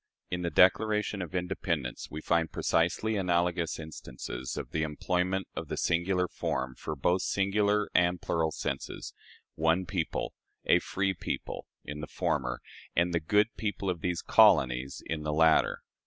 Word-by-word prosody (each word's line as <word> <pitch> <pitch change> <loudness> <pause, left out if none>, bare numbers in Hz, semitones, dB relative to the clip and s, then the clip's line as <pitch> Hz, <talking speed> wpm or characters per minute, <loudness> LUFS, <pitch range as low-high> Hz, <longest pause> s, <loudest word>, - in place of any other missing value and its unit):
In 90 0 -1
the 85 - -1
Declaration 105 +3 +3
of 90 0 -6
Independence 90 -7 -2
we 75 - -6
find 85 0 +1
precisely 105 +6 +1
analogous 85 -2 +1
instances 65 -5 -6
of - - -5
the 80 - -1
employment 90 +5 -1
of - - -4
the - - -4
singular 90 +2 +1
form 65 -5 -2
for 75 - -5
both 90 +7 +1
singular 105 +1 +1
and 90 0 +3
plural 80 -1 0
senses - - -4 0.4
"one 80 +3 +2
people," 90 -3 -2 0.3
"a - - +5
free 95 0 -1
people," - - -5 0.2
in 75 0 -6
the 75 - -5
former, 60 -3 -1 0.3
and 85 +1 +2
"the 85 - +2
good 105 +7 +2
people 100 -3 -1
of 85 -2 -6
these 90 -2 -1
colonies" 65 +1 +4
in 80 -1 -3
the 75 0 -2
latter. 80 +1 +4
85 Hz, 155 wpm, -30 LUFS, 80-95 Hz, 0.4 s, a